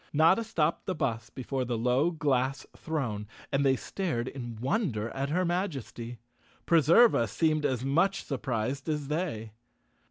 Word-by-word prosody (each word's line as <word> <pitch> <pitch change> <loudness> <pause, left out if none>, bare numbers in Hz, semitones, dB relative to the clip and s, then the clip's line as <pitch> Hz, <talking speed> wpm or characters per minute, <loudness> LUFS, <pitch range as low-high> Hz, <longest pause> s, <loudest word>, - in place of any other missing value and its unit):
Notta 165 +9 +4
stopped 170 -8 -1
the 185 - -1
bus 115 -6 -2
before 130 +2 -3
the 120 -1 -2
low 125 +7 +2
glass 135 -4 0
throne 125 -10 -3 0.2
and 140 +1 +2
they 135 -1 +4
stared 125 - -3
in 120 -4 -6
wonder 120 - -1
at 135 +1 -3
her 180 +4 +1
Majesty. 140 - -3 0.5
Preserva 165 - +5
seemed 155 +7 +1
as 130 -1 -2
much 170 +8 +2
surprised 135 +1 -2
as 150 -2 -2
they. 150 -10 -2
135 Hz, 140 wpm, -29 LUFS, 120-165 Hz, 0.5 s, Preserva